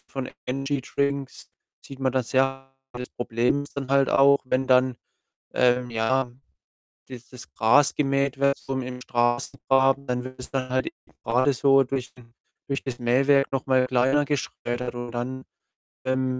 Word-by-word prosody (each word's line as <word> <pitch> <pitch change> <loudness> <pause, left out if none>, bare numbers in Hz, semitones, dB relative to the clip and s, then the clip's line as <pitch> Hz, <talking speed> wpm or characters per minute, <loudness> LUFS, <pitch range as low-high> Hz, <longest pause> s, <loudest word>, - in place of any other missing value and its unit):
von 135 -2 -5 0.2
Energy 135 +2 -2
Drinks 140 0 -3 0.4
sieht 135 - -11
man 130 -1 +1
das 130 -3 -2
ja. 135 0 +1 0.3
Das 125 +1 -6
Problem 120 +4 0
ist 145 - -17
dann 135 -2 -4
halt 140 0 +4
auch, 140 +1 +5
wenn 130 +1 0
dann, 130 -1 +3 0.6
ähm, 125 0 +2
ja, 120 +3 0 0.8
dieses 125 -1 -11
Gras 130 +6 +4
gemäht 140 -1 0
wird 140 0 +2
so 135 - -5
im 125 0 -5
Straßengraben, 135 +3 +1
dann 125 0 -2
wird 130 0 -9
es - - -8
dann 130 -1 -2
halt 130 0 0 0.4
gerade 125 +5 +2
so 135 +1 +4
durch 130 0 -4
den 115 -1 -19 0.3
durch 140 -1 -2
das 130 -3 -5
Mähwerk 135 +3 +3
noch 135 -1 -1
mal 130 -1 +3
kleiner 130 +3 +2
geschreddert 125 -3 -3
und 120 0 -6
dann, 130 +2 -4 0.6
ähm, 130 0 0
130 Hz, 155 wpm, -25 LUFS, 125-135 Hz, 0.8 s, auch